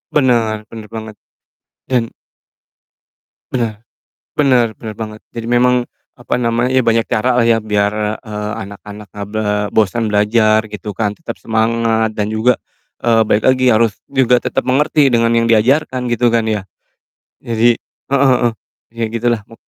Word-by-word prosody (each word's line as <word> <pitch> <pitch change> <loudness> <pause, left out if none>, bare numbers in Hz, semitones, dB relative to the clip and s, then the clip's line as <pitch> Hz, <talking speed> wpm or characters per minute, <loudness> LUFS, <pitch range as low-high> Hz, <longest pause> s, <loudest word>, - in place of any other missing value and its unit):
Benar 120 -6 +3 0.2
benar 110 -2 -9
banget 110 -1 -7 0.8
dan 120 -3 +1 1.4
Benar. 115 -4 -2 0.6
Benar 130 -5 +4
benar 110 -2 -7
banget. 110 -1 -7
Jadi 115 -1 -5
memang, 125 0 +3 0.3
apa - - -4
namanya, 120 +1 0
banyak 115 -2 +2
caralah 125 +2 +1
ya 115 -1 +3
biar, 105 -1 0 0.3
eee, 105 0 -4
anak-anak 100 +1 -11
enggak 100 -1 -6
ble 110 0 -2 0.3
bosan 110 +2 +2
belajar 110 +1 +3
gitu 105 0 -6
kan, 105 -3 0
tetap 165 +10 -7
semangat 110 0 0
dan 105 0 -2
juga, 115 +2 +2 0.5
eee, 115 -1 +4
balik 105 - +2
lagi, 130 0 +3
harus 115 -2 +3 0.2
juga 125 -2 +3
tetap - - -2
mengerti 140 +1 +2
dengan 115 0 +3
yang 115 - +3
diajarkan 125 +3 +2
gitu 120 0 +2
kan 115 -1 +2
ya. 105 -2 -1 0.8
Jadi 115 +1 +2 0.3
heeh 140 - +3
heeh. 120 -2 +2 0.4
Iya 115 0 -2
gitulah 120 -1 0
mu 115 - -15
115 Hz, 145 wpm, -16 LUFS, 110-120 Hz, 1.4 s, Benar